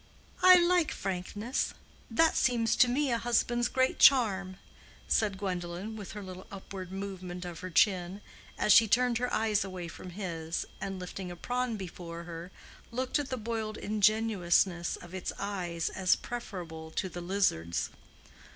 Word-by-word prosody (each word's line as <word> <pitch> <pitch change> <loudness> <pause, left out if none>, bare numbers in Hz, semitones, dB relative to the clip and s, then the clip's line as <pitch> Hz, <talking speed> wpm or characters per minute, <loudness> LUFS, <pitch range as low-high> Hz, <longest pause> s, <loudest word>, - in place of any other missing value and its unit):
"I 370 0 +10
like 350 -2 +4
frankness: 200 +6 -3 0.3
that 320 +8 +3
seems 235 -2 +2
to 255 - +7
me 265 +2 +1
a 235 - +1
husband's 240 0 +1
great 260 +1 +1
charm," 195 -8 +5 0.5
said 205 -3 +2
Gwendolen, 185 +2 -4
with 205 -3 -8
her 210 -1 -6
little 185 +1 -9
upward 190 -2 -8
movement 185 -2 -6
of 175 -1 -7
her 185 - -6
chin, 185 +1 +2 0.4
as 210 - +5
she 225 0 +7
turned 245 +1 +3
her 250 0 -1
eyes 215 -1 +2
away 185 -3 -6
from 180 - -9
his, 170 -3 -4 0.2
and 195 -1 -3
lifting 180 0 -6
a 175 - -6
prawn 245 +4 -2
before 170 -3 -7
her, 170 +1 -8 0.4
looked 255 +4 -1
at 285 - -3
the 255 - -2
boiled 220 -1 -3
ingenuousness 200 -4 +2
of 175 +1 -12
its 185 -1 -3
eyes 180 -5 -2
as 185 -1 +3
preferable 175 -9 -7
to 175 - -2
the 175 -1 -7
lizard's. 175 - 0
195 Hz, 155 wpm, -30 LUFS, 180-230 Hz, 0.5 s, I